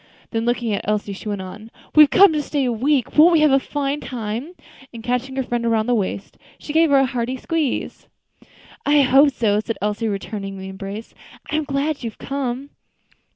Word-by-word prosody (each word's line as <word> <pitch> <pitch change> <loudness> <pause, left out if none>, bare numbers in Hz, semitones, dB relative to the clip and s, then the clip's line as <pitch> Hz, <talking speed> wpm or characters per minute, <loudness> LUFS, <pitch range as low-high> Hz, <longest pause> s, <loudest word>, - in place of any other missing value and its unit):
Then, 225 0 -1
looking 240 -2 0
at 200 - -1
Elsie, 210 -1 -1
she 205 +2 -7
went 200 -2 -3
on, 210 +4 -10 0.2
"We've 300 -2 +8
come 385 0 +6
to 300 - 0
stay 285 -1 -1
a 245 - +1
week; 260 +3 0
won't 340 +3 +8
we 320 - +4
have 305 -2 +5
a 270 - +5
fine 285 +1 -3
time?" 240 +5 -5 0.4
and, 230 -2 -10
catching 250 +2 -2
her 265 - 0
friend 240 -1 -1
round 220 -1 +1
the 245 - +2
waist, 200 -2 -3 0.2
she 295 - -7
gave 325 0 +4
her 280 - +5
a 270 - +4
hearty 250 0 -3
squeeze. 310 -1 -3 0.8
"I 290 0 +4
hope 270 +2 +5
so," 215 -6 +1
said 220 0 -4
Elsie, 210 +2 -1
returning 195 -1 -5
the 190 0 -7
embrace. 195 +3 -7 0.4
"I - - 0
am 310 -1 0
glad 280 0 -2
you 230 - -2
have 215 - -17
come." 275 0 -4
245 Hz, 205 wpm, -21 LUFS, 215-280 Hz, 0.8 s, We've